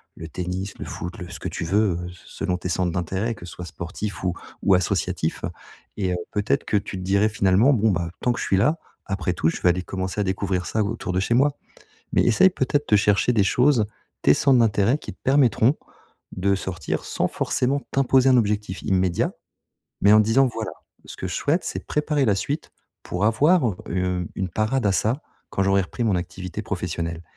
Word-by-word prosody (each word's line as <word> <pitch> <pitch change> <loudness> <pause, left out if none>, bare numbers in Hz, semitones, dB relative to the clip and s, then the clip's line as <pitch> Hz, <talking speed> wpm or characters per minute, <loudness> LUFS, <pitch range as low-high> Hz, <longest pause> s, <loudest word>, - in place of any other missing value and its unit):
le 80 - -8
tennis, 90 +4 -4
le - - -5
foot, 90 +6 -6
le 90 -1 -7
ce - - -7
que - - -4
tu - - -4
veux, 100 0 +2
heu, 90 0 -6
se 90 0 -15
selon 90 - -1
tes 90 - -5
centres 90 0 0
d'intérêts, 95 +6 -2
que 100 - -11
ce 85 - -9
soit 90 - -7
sportifs 90 +5 -6
ou 90 -2 +1 0.3
ou 100 - +4
associatif, 90 -1 -1 0.5
et 95 -3 0
heu, - - -1
peut-être 105 0 0
que 105 - +1
tu 100 -1 -4
te 95 - -6
dirais: 100 +3 +2
«Finalement, 100 +5 +4
bon, 110 -3 +3
bah 85 -2 -1
tant 125 - +2
que - - -5
je - - -2
suis 95 - +2
là, 150 - +3 0.3
après 95 -2 -2
tout 80 -2 +1
je - - -5
vais 90 - +4
aller 90 +1 0
commencer 95 +2 -3
à - - +2
découvrir 95 -1 -1
ça 110 +6 0
autour 100 -3 -3
de 90 - +1
chez 110 - 0
moi». 140 +3 +3 0.6
Mais - - +4
essayes 120 - +5
peut-être 145 -2 -1
de 105 - +7
chercher 100 +3 +3
des 105 -3 +4
choses, 125 +2 +3 0.4
tes - - +6
centres 135 - +4
d'intérêt 110 +2 +3
qui - - -8
te - - -21
permettront 130 -1 +3 0.6
de 100 +2 +1
sortir 90 -3 -4
sans - - -1
forcément 135 +3 0
t'imposer 135 -1 +4
un 130 - +6
objectif 105 -4 -1
immédiat, 95 -2 +1 0.7
mais 100 - +6
en 105 - +8
te - - +3
disant 130 +5 +4
voilà: 110 -1 -4 0.3
«Ce - - -9
que - - -4
je - - -4
souhaite - - +1
c'est - - -5
préparer 150 -1 0
la 105 - +4
suite, 145 +10 -3 0.3
pour 90 +3 -2
avoir, 150 +10 +4
heu, 105 -6 -1
une 90 -1 -1
une 95 -1 -2
parade 110 +5 0
à 100 - +3
ça, 115 +9 0 0.3
quand 95 - 0
j'aurai 95 0 +3
repris 95 +6 -5
mon 105 -5 +2
activité 90 +3 -5
professionnelle». 85 -5 -4
100 Hz, 215 wpm, -23 LUFS, 90-115 Hz, 0.7 s, en